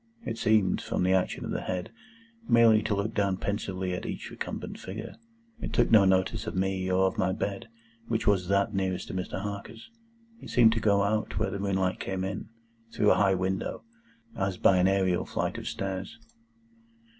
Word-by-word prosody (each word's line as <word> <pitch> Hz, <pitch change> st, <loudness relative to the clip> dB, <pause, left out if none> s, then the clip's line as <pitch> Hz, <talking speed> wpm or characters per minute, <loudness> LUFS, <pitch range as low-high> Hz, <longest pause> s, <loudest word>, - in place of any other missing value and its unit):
It 115 Hz, -, -4 dB
seemed, 105 Hz, -4 st, +3 dB
from -, -, -2 dB
the 95 Hz, +1 st, +3 dB
action 95 Hz, -1 st, 0 dB
of -, -, -4 dB
the -, -, -2 dB
head, 90 Hz, +3 st, -4 dB, 0.6 s
merely 115 Hz, -2 st, +6 dB
to 110 Hz, -1 st, -1 dB
look 100 Hz, +2 st, -2 dB
down 100 Hz, -3 st, +1 dB
pensively 95 Hz, -2 st, -3 dB
at 90 Hz, -, -4 dB
each -, -, -6 dB
recumbent -, -, -6 dB
figure. 105 Hz, +4 st, -7 dB, 0.5 s
It -, -, -5 dB
took -, -, +2 dB
no 105 Hz, -3 st, +7 dB
notice 95 Hz, +4 st, +1 dB
of 110 Hz, -, -4 dB
me, 95 Hz, 0 st, -1 dB
or 95 Hz, +1 st, +3 dB
of 95 Hz, -, -1 dB
my 95 Hz, 0 st, +2 dB
bed, 100 Hz, +1 st, -3 dB, 0.4 s
which 115 Hz, -1 st, -1 dB
was 95 Hz, -3 st, +2 dB
that 100 Hz, +1 st, +1 dB
nearest 95 Hz, -1 st, -2 dB
to -, -, -5 dB
Mr. 95 Hz, 0 st, -3 dB
Harker's. 105 Hz, -, -7 dB, 0.5 s
It -, -, -10 dB
seemed 115 Hz, -2 st, +5 dB
to 115 Hz, -, -1 dB
go 100 Hz, -2 st, +3 dB
out 105 Hz, +1 st, -1 dB
where -, -, 0 dB
the 100 Hz, -, -4 dB
moonlight 95 Hz, -2 st, 0 dB
came 95 Hz, -1 st, -3 dB
in, 95 Hz, +2 st, -4 dB, 0.4 s
through 105 Hz, -, +3 dB
a -, -, +3 dB
high 95 Hz, -1 st, +4 dB
window, 95 Hz, +3 st, -2 dB, 0.5 s
as 95 Hz, -1 st, -1 dB
by 95 Hz, -, +4 dB
an 90 Hz, +1 st, +4 dB
aërial 95 Hz, -2 st, +1 dB
flight -, -, -2 dB
of -, -, -7 dB
stairs. 95 Hz, +3 st, -4 dB
95 Hz, 190 wpm, -28 LUFS, 95-105 Hz, 0.6 s, no